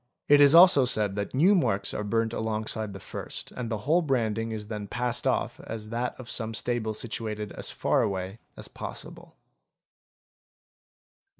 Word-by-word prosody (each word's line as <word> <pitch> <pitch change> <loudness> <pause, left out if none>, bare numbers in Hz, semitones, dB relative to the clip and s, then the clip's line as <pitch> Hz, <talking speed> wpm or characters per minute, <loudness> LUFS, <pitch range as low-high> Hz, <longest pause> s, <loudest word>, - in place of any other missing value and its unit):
It 145 0 +6
is 145 +2 +7
also 170 -5 +8
said 105 -5 +1
that 100 +4 -4
new 175 +9 +5
marks 100 - +1
_ - - -2
are 105 - -2
burnt 115 +2 0
alongside 110 -1 -2
the 95 - -8
first - - -7
and 125 -2 -5
the 110 - -1
whole 165 +4 +4
branding 115 -6 -1
is 110 -1 -5
then 105 -1 -6
passed 125 +2 -1
off - - 0
as 110 -1 -7
that 120 +3 -3
of 125 - -9
some 115 -2 -3
stable 120 -3 -1
situated 105 -2 -4
as - - -3
far - - +1
away 95 +2 -3 0.2
as - - -7
possible. - - -8
115 Hz, 170 wpm, -27 LUFS, 105-125 Hz, 0.2 s, also